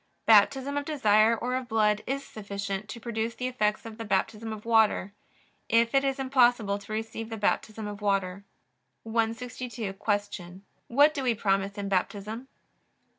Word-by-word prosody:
Baptism 265 +6 +4
of 285 - -2
desire 225 -6 +3
or 250 +2 -3
of 255 -1 -3
blood 215 -2 +2
is 275 +1 -2
sufficient 200 -1 -5
to 235 - -7
produce 225 0 -3
the 250 - -4
effects 215 -4 0
of 225 0 -9
the - - -3
Baptism 210 +2 -1
of 215 0 -7
water, 220 -3 +3 0.6
if 230 0 +3
it 275 0 +4
is 270 0 0
impossible 245 -6 +2
to 200 +1 -12
receive 225 +1 -4
the 225 - -5
Baptism 215 +1 -1
of 205 0 -6
water. 195 -1 0 0.6
162. 230 -1 -3
Q. 205 -3 -3 0.3
What 290 +5 +5
do 285 - -3
we 245 -3 +1
promise 195 0 0
in 200 -1 -3
Baptism? 205 +5 -2
220 Hz, 160 wpm, -28 LUFS, 205-240 Hz, 0.6 s, What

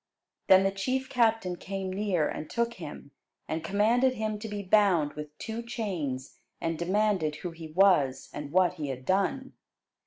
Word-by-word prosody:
Then 190 0 +7
the 195 - +2
chief 260 +7 -2
captain 225 -7 +2
came 190 0 -4
near, 190 -6 +1
and 155 - -5
took 235 0 0
him, 150 -7 -9 0.4
and 160 0 -3
commanded 230 +8 +2
him 215 -2 -2
to 220 - -6
be 205 -1 -4
bound 185 -7 +3
with 150 0 -8
two 225 +1 -5
chains; 175 - -4 0.2
and 165 0 -1
demanded 185 -2 +1
who 175 +2 -5
he 165 -1 -9
was, 155 -6 +3
and 145 -1 -6
what 180 +1 +4
he 155 -5 -5
had 130 -1 -5
done. 260 +8 0
190 Hz, 165 wpm, -29 LUFS, 155-215 Hz, 0.4 s, Then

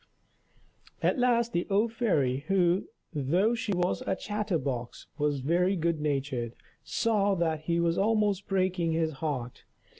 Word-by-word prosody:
At - - +2
last 235 -2 +2
the 175 - 0
old 215 +3 +2
fairy, 150 - +1
who, 185 -1 +2 0.3
though 170 - +2
she 235 -2 -2
was 180 -1 0
a 190 - -1
chatter 205 -2 -2
box, 125 -5 -4
was 145 -2 0
very 180 +7 +2
good 170 -2 0
natured, 135 -5 -2 0.3
saw 205 -4 +1
that 160 -3 -1
he 170 0 +1
was 170 0 +1
almost 205 -2 +1
breaking 185 -3 +1
his 160 -1 +1
heart. 130 -6 -3
175 Hz, 145 wpm, -29 LUFS, 150-205 Hz, 0.3 s, At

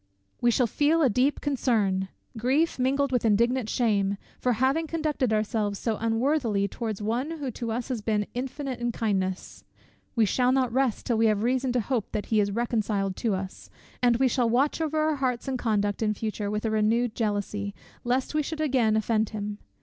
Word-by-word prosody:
We 240 - +4
shall 245 +1 +3
feel 300 +7 +2
a 265 - +4
deep 255 +7 +1
concern, 215 -9 +1 0.3
grief 265 +8 +1
mingled 275 +2 +1
with 250 -2 +1
indignant 235 +2 +2
shame, 200 -5 +1 0.2
for 250 - +1
having 265 +8 +1
conducted 305 -7 -1
ourselves 215 -1 0
so 220 0 -1
unworthily 230 -2 +1
towards 215 -1 -4
one 240 +7 -1
who 275 -4 -4
to 230 0 -4
us 235 +3 -3
has 245 -4 -2
been 210 -1 0
infinite 260 +1 -4
in 240 0 -1
kindness: 190 -5 -2 0.5
we 225 -2 +4
shall 250 +5 +2
not 255 -3 +1
rest 260 -3 +1
till 230 -3 +1
we 225 - +5
have 215 -1 +1
reason 255 +1 +1
to 250 - +2
hope 230 -2 -2
that 210 - -2
he 215 - +5
is 205 -1 +2
reconciled 210 -3 -1
to 220 -4 0
us; 190 0 -7 0.3
and 240 -2 +4
we 265 +1 +3
shall 245 -2 +1
watch 270 +7 +1
over 315 -1 -1
our 310 -1 +1
hearts 255 -2 -1
and 260 -2 -2
conduct 205 -3 0
in 215 -1 +1
future 210 -1 -3
with 210 +2 -2
a 220 - 0
renewed 220 +2 +2
jealousy, 205 -2 -2 0.3
lest 250 +3 0
we 305 - +2
should 310 +2 -5
again 255 -8 +2
offend 220 0 +1
him. 210 -1 -5
235 Hz, 195 wpm, -27 LUFS, 210-260 Hz, 0.5 s, we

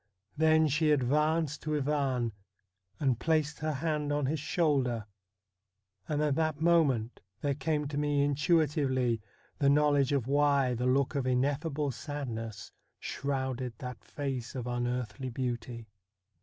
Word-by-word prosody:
Then 160 0 +4
she 155 +2 +2
advanced 150 +2 +2
to 155 0 -2
Ivan 135 -5 0 0.7
and 130 -6 +1
placed 155 -2 +1
her 155 0 -1
hand 150 0 -1
on 145 -1 +1
his 150 +3 -1
shoulder; 135 -8 +1 1.0
and 150 0 +1
at 150 -2 +2
that 155 0 0
moment 150 -9 +2 0.2
there 145 -1 +1
came 150 +1 -1
to 145 -1 -2
me 145 -1 +2
intuitively 140 -5 +1 0.4
the 140 - +4
know 150 +1 +4
ledge 140 -1 +2
of 140 -5 +1
why 140 -1 +3
the 125 +1 -1
look 135 +2 +2
of 135 -3 -1
ineffable 140 +3 0
sadness 115 -6 -6 0.3
shrouded 130 -3 -3
that 125 -1 -7
face 135 -4 -4
of 125 -2 -4
unearthly 125 +1 -2
beauty. 120 -1 -4
140 Hz, 135 wpm, -30 LUFS, 125-150 Hz, 1.0 s, Then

